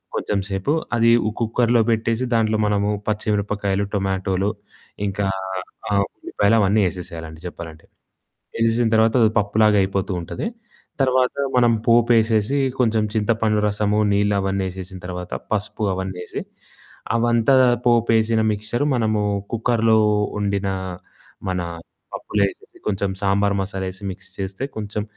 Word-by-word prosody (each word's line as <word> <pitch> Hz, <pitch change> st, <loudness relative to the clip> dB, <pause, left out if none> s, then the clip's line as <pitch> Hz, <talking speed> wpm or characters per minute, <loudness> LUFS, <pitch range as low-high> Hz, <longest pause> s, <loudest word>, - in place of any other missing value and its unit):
కొంచెంసేపు 95 Hz, +4 st, -1 dB, 0.2 s
అది 115 Hz, 0 st, +4 dB, 0.2 s
ఓ -, -, +2 dB
కుక్కర్లో 115 Hz, +1 st, +2 dB
పెట్టేసి, 115 Hz, +2 st, 0 dB
దాంట్లో 110 Hz, -1 st, +2 dB
మనము 105 Hz, 0 st, +1 dB, 0.2 s
పచ్చి 110 Hz, 0 st, -1 dB
మిరపకాయలు, 100 Hz, -1 st, -1 dB
టొమాటోలు 95 Hz, 0 st, 0 dB, 0.6 s
ఇంకా 100 Hz, +1 st, -2 dB, 0.7 s
ఆహ్, 100 Hz, -1 st, +3 dB
ఉల్లిపాయలు 100 Hz, +3 st, +1 dB
అవన్నీ 105 Hz, +1 st, +3 dB
ఏసేసేయాలండి 80 Hz, -3 st, -8 dB
చెప్పాలంటే. 80 Hz, -2 st, -9 dB, 0.7 s
ఏసేసిన 115 Hz, 0 st, +2 dB
తర్వాత, 110 Hz, 0 st, +4 dB
అది 110 Hz, -, +4 dB
పప్పులాగా 105 Hz, +1 st, +3 dB
అయిపోతూ 95 Hz, +1 st, -1 dB
ఉంటది. 85 Hz, -, -4 dB, 0.5 s
తర్వాత 130 Hz, -1 st, +2 dB, 0.2 s
మనం 120 Hz, -1 st, +5 dB, 0.2 s
పోపేసేసి, 115 Hz, +1 st, +3 dB, 0.2 s
కొంచెం 110 Hz, -3 st, +2 dB
చింతపండు 110 Hz, 0 st, +1 dB
రసము, 105 Hz, 0 st, +1 dB
నీళ్లు 100 Hz, 0 st, +2 dB
అవన్నీ 95 Hz, 0 st, -1 dB
ఏసేసిన 95 Hz, 0 st, -8 dB
తర్వాత 90 Hz, 0 st, -6 dB, 0.2 s
పసుపు 105 Hz, +1 st, -2 dB
అవన్నీ 95 Hz, -1 st, -4 dB
ఏసి -, -, -5 dB, 0.7 s
అవంతా 120 Hz, +2 st, +3 dB, 0.3 s
పోపేసేసిన 115 Hz, -1 st, +3 dB
మిక్సెచర్ 110 Hz, +5 st, -1 dB
మనము 110 Hz, -3 st, +1 dB, 0.3 s
కుక్కర్లో 115 Hz, -1 st, +2 dB, 0.4 s
వండిన 100 Hz, -1 st, -1 dB, 0.8 s
మన 95 Hz, -1 st, -1 dB, 0.5 s
పప్పులో 105 Hz, -1 st, -1 dB
ఎసేసి, -, -, -20 dB
కొంచెం 100 Hz, -1 st, 0 dB
సాంబార్ 100 Hz, 0 st, +2 dB
మసాలా 95 Hz, -1 st, -4 dB
ఎసి 95 Hz, +2 st, -14 dB
మిక్స్ 95 Hz, 0 st, -11 dB
చేస్తే, 95 Hz, +4 st, -4 dB
కొంచెం 105 Hz, 0 st, -3 dB
105 Hz, 120 wpm, -21 LUFS, 95-115 Hz, 0.8 s, మనం